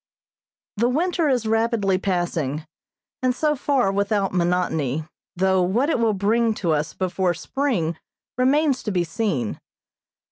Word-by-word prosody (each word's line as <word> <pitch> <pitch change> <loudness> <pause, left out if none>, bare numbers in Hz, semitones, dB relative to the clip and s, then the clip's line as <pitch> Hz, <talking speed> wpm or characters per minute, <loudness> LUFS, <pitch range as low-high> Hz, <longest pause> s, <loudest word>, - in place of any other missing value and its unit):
The 235 +3 +2
winter 330 +3 +1
is 245 -4 +1
rapidly 220 -4 +1
passing, 170 -6 -1 0.6
and 255 -1 +1
so 300 +2 +1
far 265 -7 +1
without 200 0 0
monotony, 170 -5 0 0.3
though 190 +1 +2
what 230 - +1
it - - +1
will 225 -2 +2
bring 220 +3 +2
to 175 -5 -1
us 150 0 -1
before 185 -1 0
spring 180 - -1 0.4
remains 270 +2 +2
to 210 - -3
be 180 -2 +1
seen. 165 - -2
200 Hz, 135 wpm, -23 LUFS, 175-250 Hz, 0.6 s, The